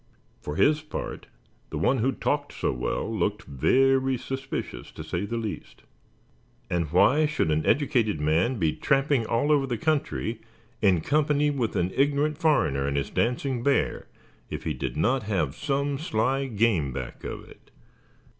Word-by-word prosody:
For 75 - -5
his 150 - +3
part, 155 - -6 0.4
the - - -4
one 130 0 +2
who 130 +5 +2
talked 145 +1 -2
so - - -1
well, 60 0 -2
looked 105 +1 -1
very 130 - +2
suspicious, 135 - -5
to - - -7
say 90 +4 -3
the 115 - -3
least; 110 -3 -6 0.9
and 85 -4 -1
why 145 - +4
should 150 - 0
an 75 0 +1
educated 120 - +2
man 80 - +1
be 80 -6 +1
tramping 135 -4 +1
all 130 +6 +1
over 140 -2 +3
the 120 -2 -2
country 130 -5 -1 0.4
in 95 -6 +4
company 150 - +2
with 125 -6 -2
an 90 +2 0
ignorant 145 +2 +1
foreigner 70 - +2
and 70 0 -1
his 70 - -2
dancing 125 +1 0
bear, 140 +3 0 0.4
if - - -5
he - - -1
did - - -4
not 130 +3 +2
have 80 -9 0
some 140 - -1
sly 135 -2 0
game 105 - +1
back - - -7
of - - -6
it? - - -18
125 Hz, 160 wpm, -26 LUFS, 95-140 Hz, 0.9 s, why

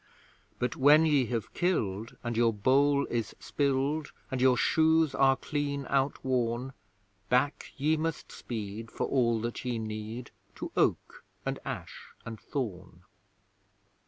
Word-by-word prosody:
But 125 +6 -1
when 150 +2 +6
ye 145 -6 +3
have 115 -1 -3
killed, 115 - -1
and 120 -1 -2
your 115 0 +4
bowl 140 +6 +3
is 115 -3 -2
spilled, 140 +2 0 0.2
And 130 -1 -1
your 130 -1 +5
shoes 160 +2 +3
are 135 -1 +4
clean 140 0 -3
outworn, 130 -2 0 0.6
Back 130 +4 +1
ye 155 +3 +2
must 160 0 -3
speed 110 -1 -6
for - - -2
all 120 -4 +2
that 120 +1 -4
ye 125 -2 -1
need, 110 +2 -5 0.2
To - - -6
Oak - - 0 0.2
and - - -2
Ash - - -7 0.2
and 115 -1 -7
Thorn! 95 - -5
130 Hz, 130 wpm, -30 LUFS, 115-145 Hz, 0.6 s, when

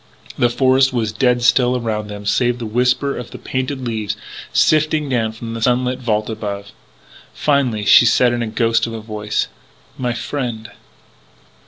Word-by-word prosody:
The 120 - +2
forest 130 +2 +3
was 115 -4 -1
dead 120 +2 +1
still 125 +1 +3
around 110 -3 -3
them 105 0 -8
save 120 +4 +2
for - - -13
the - - -3
whisper 125 +5 +1
of 120 - -7
painted 130 0 -3
leaves 110 -2 -3 0.3
sifting 155 -1 +2
down 115 -4 0
from 115 +1 -7
a 115 - -5
sunlit 125 +1 +1
vault 110 -4 -1
above. 100 -2 -5 0.6
Finally 130 -8 +1
she 120 - +7
said 120 +2 +4
in 120 - -2
a 115 - -1
ghost 115 +1 +1
of 115 - -6
a 115 - -5
voice: 105 -1 -3 0.5
"My 125 -2 -1
friend...." 120 -3 -4
120 Hz, 165 wpm, -19 LUFS, 110-125 Hz, 0.6 s, she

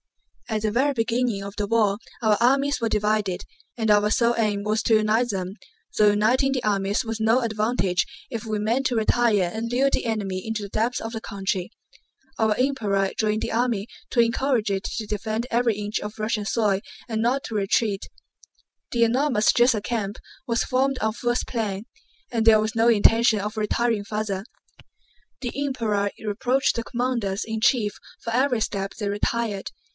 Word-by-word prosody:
At 215 -1 -1
the 215 - +1
very 270 +6 +2
beginning 230 -3 0
of 200 0 -7
the 205 - -1
war 210 -2 +2 0.3
our 215 -1 +4
armies 275 +2 +3
were 230 - +1
divided, 210 -3 0 0.3
and 220 -2 0
our 210 0 +4
sole 235 +2 +3
aim 210 -3 0
was 215 +1 0
to 225 - +4
unite 215 +3 +2
them, 190 -2 -3 0.4
though 210 -1 +6
uniting 235 +6 +2
the 255 -2 -1
armies 200 +2 0
was 225 0 -4
no 225 +3 +4
advantage 215 -5 0 0.2
if 230 -5 -5
we 220 -2 -2
meant 235 +6 +1
to 245 - -2
retire 220 -4 +2
and 230 +1 -3
lure 265 +3 +3
the - - -1
enemy 200 -5 -2
into 220 -2 -3
the - - -5
depths 225 +5 0
of 225 +1 -6
the 225 - -4
country. 195 -2 -3 0.7
Our 220 -1 +3
Emperor 210 -8 +1
joined 215 0 0
the - - -3
army 230 -3 0 0.2
to 245 - -1
encourage 230 -2 +2
it 195 0 -1
to 220 - -3
defend 215 +3 -3
every 235 -2 +2
inch 210 0 -2
of 210 +1 -7
Russian 215 -1 -1
soil 205 -3 +1 0.3
and 220 -1 -2
not 255 +4 +1
to 225 - -5
retreat. 200 0 0 0.8
The 235 -1 +3
enormous 240 -1 +3
Drissa 240 -3 +3
camp 210 -3 -2 0.3
was 230 -1 +1
formed 265 +1 +1
on 220 0 0
Pfuel's 240 +1 -1
plan, 215 -3 -3 0.5
and 230 -2 +1
there 220 -1 +7
was 215 +2 -1
no 230 +1 +4
intention 225 0 +4
of 210 +2 -4
retiring 220 0 0
farther. 210 -1 -3 1.0
The 245 -3 -3
Emperor 220 -7 0
reproached 245 +5 0
the 230 - -2
commanders 235 -5 -1
in 225 -1 -4
chief 230 -4 +3 0.3
for 230 - -4
every 255 -1 +2
step 195 -2 -3
they 210 -2 -3
retired. 205 0 -1
220 Hz, 180 wpm, -24 LUFS, 210-240 Hz, 1.0 s, there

